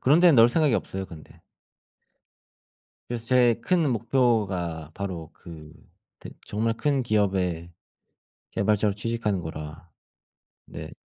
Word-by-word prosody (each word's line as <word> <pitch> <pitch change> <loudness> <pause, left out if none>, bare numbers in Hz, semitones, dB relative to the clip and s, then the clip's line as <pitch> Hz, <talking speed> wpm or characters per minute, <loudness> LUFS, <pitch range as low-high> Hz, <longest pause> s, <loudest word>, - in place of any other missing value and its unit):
그런 145 +6 +4
데는 175 -3 +7
넣을 115 +1 +8
생각이 150 -2 +2
없어요 95 0 -3
근데. 80 -4 -14 1.7
그래서 120 -1 -4
제 125 -1 +4
큰 170 -6 +2
목표가 105 - 0
바로 90 -5 -5
그 80 -2 -12 0.5
대 - - -9 0.2
정말 115 +2 -1
큰 140 +1 0
기업의 95 -6 0 0.8
개발자로 105 0 +1
취직하는 105 -3 -2
거라. 80 0 -8 0.8
네. - - -9
105 Hz, 235 characters per minute, -25 LUFS, 85-120 Hz, 1.7 s, 넣을